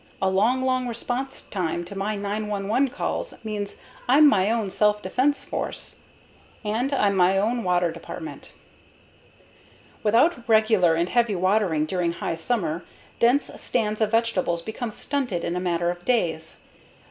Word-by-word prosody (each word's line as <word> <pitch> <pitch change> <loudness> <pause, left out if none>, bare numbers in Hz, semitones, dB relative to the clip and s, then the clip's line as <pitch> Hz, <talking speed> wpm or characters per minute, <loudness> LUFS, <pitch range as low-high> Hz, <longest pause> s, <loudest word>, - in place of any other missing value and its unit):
A 190 0 +1
long, 230 +7 +2
long 255 -1 +1
response 245 +3 -4
time 175 -3 -3
to 200 - -9
my 200 +2 -2
911 210 +4 -1
call 280 - -2 0.2
means 210 -2 -4 0.3
I'm 290 +4 +7
my 200 -7 +3
own 220 -4 0
self 210 +1 +2
defense 260 +9 +1
force. - - -5 0.7
And 230 +6 0
I'm 205 -7 +2
my 185 +1 +4
own 230 +4 0
water 180 -2 +2
department. - - -8 1.5
Without 235 +4 +2
regular 215 -6 +4
and 170 +1 +1
heavy 235 -4 +2
watering 185 -4 +2
during 170 0 -1
high 165 - -3
summer, 170 -4 -1 0.4
dense 245 +5 +3
stands 215 -2 -1
of 215 - +3
vegetables 215 -7 0
become 225 +3 -4
stunted 245 -7 -2
in 170 - -2
a - - -1
matter 175 -1 0
of 175 0 -9
days. 165 -10 -1
210 Hz, 145 wpm, -24 LUFS, 180-235 Hz, 1.5 s, I'm